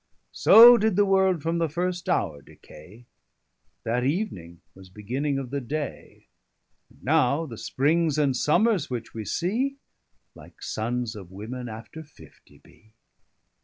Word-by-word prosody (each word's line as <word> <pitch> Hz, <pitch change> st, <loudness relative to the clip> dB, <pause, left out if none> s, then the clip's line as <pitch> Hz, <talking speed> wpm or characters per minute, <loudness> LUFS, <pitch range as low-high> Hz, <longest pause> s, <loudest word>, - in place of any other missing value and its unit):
_] -, -, -50 dB, 0.3 s
So 240 Hz, +2 st, +8 dB
did 220 Hz, -2 st, +1 dB
the 205 Hz, +1 st, +3 dB
world 190 Hz, -4 st, +2 dB
from 165 Hz, +1 st, -1 dB
the 165 Hz, -1 st, 0 dB
first 180 Hz, +3 st, -3 dB
houre 85 Hz, -, -1 dB
decay, 90 Hz, -, -16 dB, 0.8 s
That 120 Hz, +2 st, -1 dB
evening 125 Hz, -, -3 dB
was 95 Hz, -1 st, -16 dB
beginning 130 Hz, +9 st, -3 dB
of 130 Hz, -2 st, -6 dB
the 140 Hz, 0 st, -3 dB
day, 145 Hz, +4 st, -6 dB, 0.6 s
And -, -, -24 dB
now 150 Hz, +1 st, +1 dB
the 120 Hz, -7 st, -9 dB
Springs 155 Hz, +2 st, 0 dB
and 140 Hz, -4 st, +1 dB
Sommers 185 Hz, -, +1 dB
which 120 Hz, -3 st, -6 dB
we 110 Hz, -1 st, -6 dB
see, 240 Hz, -, -2 dB, 0.6 s
Like -, -, -16 dB
sonnes 120 Hz, +1 st, -4 dB
of 95 Hz, -4 st, -10 dB
women 115 Hz, +6 st, -7 dB
after 110 Hz, +8 st, -10 dB
fiftie 145 Hz, -3 st, -19 dB
bee. 110 Hz, 0 st, -23 dB
140 Hz, 145 wpm, -25 LUFS, 115-175 Hz, 0.8 s, So